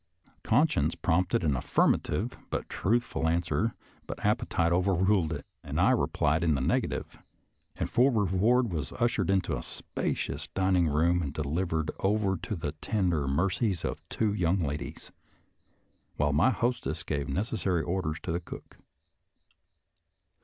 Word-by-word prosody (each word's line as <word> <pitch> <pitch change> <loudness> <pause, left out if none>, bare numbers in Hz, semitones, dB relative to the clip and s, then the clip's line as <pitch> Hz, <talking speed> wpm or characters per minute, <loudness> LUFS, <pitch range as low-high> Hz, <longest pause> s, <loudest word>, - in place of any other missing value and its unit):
Con 140 +9 +4
science 75 - 0
prompted 90 +2 +1
an 75 -4 +2
affirmative 60 - +1 0.2
and - - -2
truthful 110 -5 0
answer, 85 +7 0 0.3
but - - -6
appetite 85 0 +1
overruled 90 -1 +2
it, 75 -3 -5 0.2
and - - -3
I - - +5
replied 80 +2 +1
in 80 -3 +3
the - - -1
negative, 65 - -1 0.6
and - - -2
for 130 +3 +4
reward 110 +3 +2
was 75 -5 -3
ushered 115 -6 0
into 95 -1 +1
a - - -4
spacious - - -4
dining 95 -2 +2
room 85 +4 +2
and 70 -4 -3
delivered 80 +2 -1
over 100 -1 +1
to 90 +4 -4
the 75 -4 -3
tender 90 -9 0
mercies 90 - 0
of - - -3
two 110 -2 0
young 95 -1 +1
ladies, 75 -1 -5 1.0
while 75 0 +1
my 80 - +4
hostess 120 -11 -1
gave 75 -2 -2
necessary 95 -4 -1
orders 80 -1 -2
to - - -3
the 85 - 0
cook. - - -10
90 Hz, 140 wpm, -29 LUFS, 80-100 Hz, 1.0 s, I